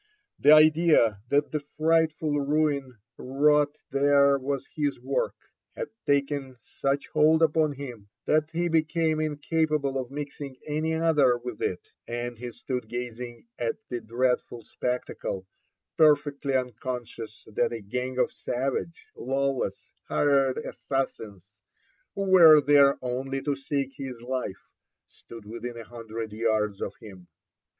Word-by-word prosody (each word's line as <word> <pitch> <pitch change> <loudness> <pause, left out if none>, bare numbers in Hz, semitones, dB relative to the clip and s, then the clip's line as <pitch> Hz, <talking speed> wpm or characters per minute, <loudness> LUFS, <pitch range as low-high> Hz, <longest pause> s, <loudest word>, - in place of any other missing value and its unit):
The 145 - +6
idea 155 -9 +5
that 145 +1 +2
the 150 - -1
fright 160 +2 +2
ful 150 -1 -1
ruin 140 -3 0 0.2
wrought 145 +2 +2
there 140 0 +4
was 135 0 -3
his 145 -2 -1
work, - - -1 0.4
had - - -4 0.2
taken 140 -2 0
such 140 +4 -2
hold 155 +1 +4
upon 155 -1 +3
him 125 -7 -9 0.2
that 155 0 +2
he 170 +2 -1
became 160 -1 +1
incapable 155 -2 0
of 125 -2 -5
mixing 140 -1 -7
any 155 +2 -1
other 150 -6 +3
with 120 -2 -7
it, 90 - -3 0.2
and 120 +1 -4
he 125 0 -6
stood 125 -1 -5
gazing 120 0 -6
at 115 -1 -1
the 120 -2 -3
dreadful 120 +1 -1
spectacle, 125 -6 -4 0.5
perfectly 145 -3 +3
unconscious 120 -3 -4
that - - +1
a 115 - -4
gang 125 +5 -4
of - - +2
savage, 135 +6 -3
lawless, 135 -6 -2 0.2
hired 140 -3 +2
assassins, 110 -7 -4 0.6
who 200 - -1
were 170 -5 +8
there 140 -1 +5
only 130 +2 -2
to 145 -1 0
seek 135 0 -3
his 130 -3 -6
life, 125 -6 -5 0.3
stood 115 -3 -13
within 115 +2 -6
a 115 - -7
hundred 115 -1 -7
yards 105 -2 0
of 100 - -4
him. 95 -5 -13
135 Hz, 130 wpm, -27 LUFS, 120-150 Hz, 0.6 s, were